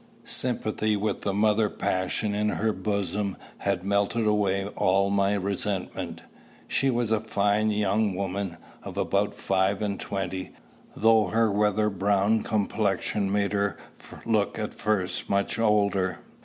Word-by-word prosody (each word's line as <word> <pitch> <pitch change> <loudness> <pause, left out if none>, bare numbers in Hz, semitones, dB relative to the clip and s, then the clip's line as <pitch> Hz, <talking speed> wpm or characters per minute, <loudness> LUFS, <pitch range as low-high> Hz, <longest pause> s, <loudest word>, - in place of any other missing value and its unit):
Sympathy 110 -3 +1
with 100 0 -2
the 100 - -1
mother 105 +1 +2
passion 95 +4 -1
in 105 +1 +1
her 110 +1 0
bosom 100 0 -2 0.2
had 100 -3 -1
melted 100 +3 +1
away 100 -2 +1
all 100 0 +2
my 100 0 +2
resentment. 100 -1 -3 0.4
She 135 - +1
was 120 -3 0
a 110 - +3
fine 105 0 +1
young 105 -1 +1
woman, 95 -2 -3 0.2
of - - -8
about - - 0
five 95 +1 +1
and 100 -2 -2
twenty, 95 -1 -4 0.4
though 110 -2 +4
her 110 +3 +2
weather 105 +1 +2
browned 100 +3 +1
complexion 105 -1 0
made 100 0 +1
her 100 0 0 0.5
look 110 -3 +1
at 110 -1 -3
first 100 -4 -1
much 100 +3 0
older. 100 -5 +2
100 Hz, 135 wpm, -26 LUFS, 100-105 Hz, 0.5 s, though